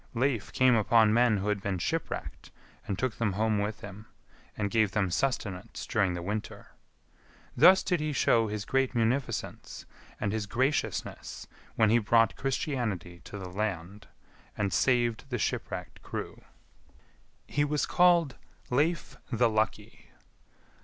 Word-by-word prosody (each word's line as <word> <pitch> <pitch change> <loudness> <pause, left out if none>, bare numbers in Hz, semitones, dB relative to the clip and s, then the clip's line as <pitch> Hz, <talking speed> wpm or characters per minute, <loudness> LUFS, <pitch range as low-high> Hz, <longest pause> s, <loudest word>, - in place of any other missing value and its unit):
Leif 120 -3 0
came 130 -1 +4
upon 110 -1 +4
men 120 -2 +4
who 100 +2 -2
had 105 -1 0
been 95 -2 -2
shipwrecked, 85 - -4 0.4
and 100 - -2
took 125 +1 -2
them 110 -4 +1
home 110 +1 +1
with 105 +2 -3
him, 105 +2 -10 0.5
and 100 -1 -1
gave 110 -3 +2
them 100 -4 +1
sustenance 105 -2 -2
during 100 -5 +1
the 85 - -5
winter. 105 +3 -5 0.8
Thus 185 +8 +7
did 180 -3 0
he 155 0 -1
show 115 -4 +3
his 105 -1 -4
great 135 -1 0
munificence 120 +4 -2 0.3
and 100 - -1
his 110 -1 -2
graciousness 130 +7 -2 0.3
when 110 -1 +4
he 120 - +5
brought 115 0 +3
Christianity 115 - -3
to 105 - -8
the 95 -2 -7
land, 100 0 -4 0.5
and 100 -2 -1
saved 120 -3 +2
the 125 - -1
shipwrecked 100 -6 -4
crew. - - -6 1.0
He 145 - 0
was 145 0 0
called 170 -6 +3 0.3
Leif 155 +6 0
the 120 -1 +2
Lucky. 110 +1 -2
110 Hz, 140 wpm, -29 LUFS, 100-130 Hz, 1.0 s, Thus